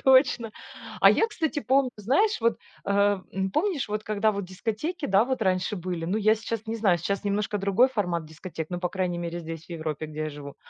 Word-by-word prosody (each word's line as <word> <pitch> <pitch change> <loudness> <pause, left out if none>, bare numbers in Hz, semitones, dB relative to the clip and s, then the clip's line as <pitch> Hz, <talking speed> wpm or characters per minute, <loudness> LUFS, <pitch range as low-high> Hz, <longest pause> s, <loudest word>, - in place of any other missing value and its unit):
Точно. 260 -3 +5 0.5
А - - +9
я, 450 - +3
кстати, 320 -8 -2
помню, 265 0 +2
знаешь, 275 - +2
вот, 230 0 +2 0.3
а, 200 -1 +2
м, 190 0 -1
помнишь 310 - 0
вот, 210 +1 -3
когда 215 0 +1
вот 200 -1 -3
дискотеки, 225 - -3
да, 195 +3 +4
вот 260 0 -2
раньше 185 0 +1
были? 175 -2 -4
Ну, 185 +6 0
я 215 0 +4
сейчас 225 0 -5
не 225 +1 -2
знаю, 195 -6 +3
сейчас 200 +5 -2
немножко 205 +1 0
другой 200 +6 +4
формат 180 -10 -1
дискотек, 160 +1 -7
ну, 175 - -2
по 180 - -1
крайней 180 -2 -1
мере, 170 0 -4
здесь, 165 -1 -7
в - - -21
Европе, 155 -2 -4
где 155 0 -7
я 155 - -3
живу. 145 -1 -9
200 Hz, 215 wpm, -26 LUFS, 175-230 Hz, 0.5 s, А